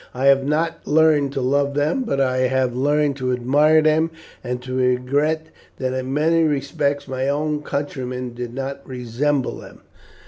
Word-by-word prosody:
I 130 +2 -1
have 135 0 +5
not 160 +4 -1
learned 150 -2 +3
to 135 - -2
love 140 +2 +1
them, 150 - +1
but 230 - -1
I 130 -1 +1
have 130 -1 0
learned 145 +1 +1
to 130 -1 -1
admire 145 +6 +3
them 155 +1 +3 0.3
and 125 0 -3
to 130 0 -6
regret 135 +5 +1 0.3
that 130 -1 -2
in 130 0 -3
many 160 +3 +2
respects 140 -1 -1
my 130 +1 -2
own 150 +1 -1
countrymen 125 -4 -4
did 120 0 -6
not 135 +1 -4
resemble 130 +2 -2
them." - - -13
140 Hz, 165 wpm, -21 LUFS, 130-150 Hz, 0.3 s, have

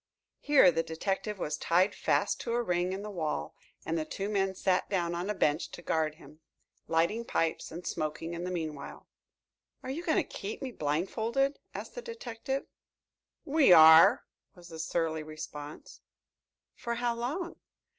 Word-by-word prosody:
Here 280 -11 +6
the 165 - +1
detective 195 +6 -3
was 150 -4 -3
tied 185 +4 +2
fast - - 0
to 235 - -3
a 240 0 +1
ring 180 -2 0
in 195 +2 -4
the 210 - -6
wall 160 -5 -3 0.3
and 165 0 -1
the - - -1
two 195 +5 -4
men 195 -2 0
sat 185 0 +1
down 175 -4 0
on 175 +3 -3
a 210 - -1
bench 150 -2 +1
to 175 - -9
guard 155 -2 0
him, 150 0 -16 0.5
lighting 170 +8 +1
pipes 165 -7 -1
and 175 +2 -8
smoking 155 +2 -3
in 170 +1 -5
the 180 - -3
meanwhile. 160 -5 -5 0.8
"Are 260 - -4
you 325 +6 -4
going 320 - +1
to - - +3
keep 200 +2 -6
me 265 -2 -5
blindfolded?" 220 - -1 0.2
asked - - -6
the - - -6
detective. 270 - -5 0.8
"We 295 -6 +4
are," 160 0 +8 0.3
was 175 -1 -14
the 160 -1 -9
surly 160 -1 -1
response. 155 -1 -9 0.7
"For 235 0 -4
how 240 0 0
long?" 290 +10 -4
180 Hz, 165 wpm, -30 LUFS, 160-235 Hz, 0.8 s, are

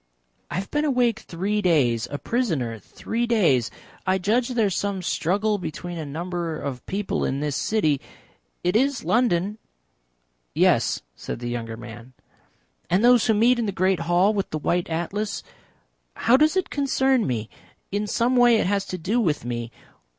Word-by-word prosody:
"I - - -5
have 190 +2 -4
been 295 0 +1
awake 245 -6 +2
three 200 +5 -2
days 125 - +2
a 145 - -4
prisoner 150 - -1
three 235 - -3
days. 165 - +3 0.4
I 185 0 +3
judge 225 +7 +1
there 240 -4 +1
is 195 - 0
some 200 -2 -2
struggle 200 +7 0
between 175 0 -6
a 155 - -4
number 170 +1 -3
of 130 -3 -5
people 195 +1 -2
in 135 - -1
this 145 -1 -2
city 155 -11 +1 0.6
it 180 +2 +1
is 270 +3 +2
London?" 210 -3 +1 1.0
"Yes," - - +2
said - - -6
the 120 0 -5
younger 115 -2 -4
man. 120 +1 -11 0.8
"And 190 +6 +3
those 245 -1 +5
who 220 - +4
meet 240 +3 +4
in 230 - 0
the - - 0
great 190 0 +1
hall 175 +5 +3
with 200 -2 -2
the 155 - -3
white 170 +3 -1
Atlas? 195 +6 -3 0.7
How 235 - +4
does 305 +6 +4
it 375 - -1
concern 265 - +2
me? 115 -4 -2 0.4
In 205 +1 -1
some 235 +5 +1
way 245 -1 +6
it 220 - +2
has 200 +1 0
to 185 - -4
do 200 +8 0
with 155 - 0
me. 120 -1 -3
190 Hz, 170 wpm, -24 LUFS, 155-230 Hz, 1.0 s, way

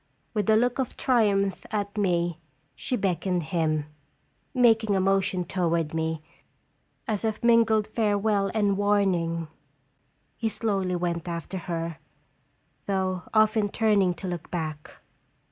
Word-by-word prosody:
With 210 -2 0
a 220 - +6
look 245 +3 +2
of 260 - -2
triumph 200 -6 +2
at 205 -1 -3
me, 175 -5 0 0.3
she 255 - -2
beckoned 185 -3 0
him. 155 -2 0 0.7
Making 225 -4 +3
a - - +2
motion 190 -1 +1
toward 170 -3 0
me, 160 -1 -2 0.8
as 215 -1 -2
of 220 0 -2
mingled 225 -2 +4
farewell 205 -2 +1
and 205 -2 +2
warning, 185 -5 +1 0.9
he 225 - -1
slowly 195 -5 -1
went 175 -1 -2
after 170 +2 -4
her, 165 -2 -3 0.9
though 190 -2 0
often 215 -1 +3
turning 200 -5 +2
to 185 - -6
look 175 -2 -5
back. 155 -3 -4
195 Hz, 125 wpm, -26 LUFS, 170-215 Hz, 0.9 s, a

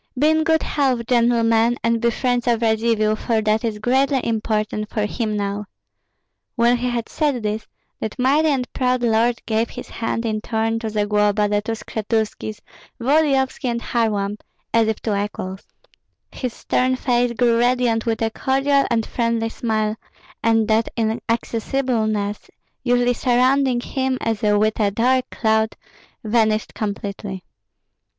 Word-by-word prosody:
Be 300 +4 +4
in 315 0 +2
good 320 0 +2
health, 260 -5 0
gentlemen, 235 -1 +3
and 230 0 +1
be 235 - +3
friends 245 +1 -1
of 235 -1 +2
Radzivill, 220 -1 +2
for 225 +1 0
that 215 +1 +1
is 225 -2 -2
greatly 265 +5 +2
important 215 -1 -1
for 210 -2 -1
him 215 0 -2
now." 205 +1 -2 0.9
When 240 +1 +3
he 250 +1 -1
had 235 -2 -2
said 285 -7 -1
this, 215 +1 -3 0.3
that 220 - -4
mighty 280 +5 +3
and 265 -4 0
proud 250 -1 0
lord 235 +1 +1
gave 225 +1 0
his - - -9
hand 230 0 -3
in 215 -1 -1
turn 225 0 -1
to 225 -1 -3
Zagloba, 210 0 +1
the 205 0 +1
two 225 +2 -3
Skshetuskis, 220 -1 -3 0.4
Volodyovski, 270 0 +2
and 235 0 -1
Kharlamp, 210 -4 -1 0.3
as 230 -1 +4
if 220 -1 -1
to 205 -2 0
equals. 190 -2 -6 0.6
His 250 -2 -4
stern 255 0 +1
face 245 -1 +1
grew 235 -1 +2
radiant 240 -2 +1
with 225 0 0
a 225 - 0
cordial 275 +4 +1
and 230 -2 +1
friendly 230 -1 -1
smile, 215 -2 -1 0.5
and 225 -1 +2
that 220 +1 +2
inaccessibleness 225 -1 -1 0.3
usually 245 0 +2
surrounding 255 +1 +2
him 265 0 -1
as 225 -2 -2
with 215 +1 +2
a 205 -2 +3
dark 255 +5 +1
cloud 220 -1 0 0.5
vanished 220 -1 +1
completely. 200 -2 -5
230 Hz, 145 wpm, -21 LUFS, 215-245 Hz, 0.9 s, Be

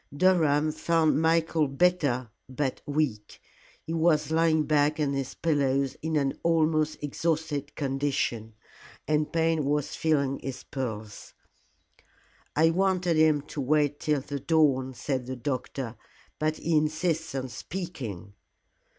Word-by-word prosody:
Durham 155 -4 +3
found 160 -1 +2
Michael 160 -1 +2
better 135 -6 +1 0.2
but 130 0 -2
weak. 145 -8 -2 0.5
He 165 - -4
was 160 -2 +2
lying 160 -1 +3
back 150 0 +2
on 145 -2 +1
his 135 -1 -3
pillows 140 -4 +1
in 160 0 -2
an 140 -2 0
almost 155 -2 +2
exhausted 150 -1 -2
condition, 135 -6 -2 0.5
and 150 0 +1
Payne 165 -2 +1
was 145 +1 -1
feeling 140 -4 +1
his 130 -1 -6
pulse. 110 -6 -6 1.2
"I 160 +2 +4
wanted 180 -1 +1
him 155 -2 +4
to 150 0 -6
wait 145 +1 +1
till 150 -2 0
the 140 +1 -5
dawn," 135 -4 +2
said 130 -1 -3
the 130 - -4
doctor, 130 -2 -4 0.4
"but 155 0 0
he 165 -1 0
insists 160 0 0
on 130 -1 -2
speaking." 120 - -6
150 Hz, 125 wpm, -27 LUFS, 135-160 Hz, 1.2 s, I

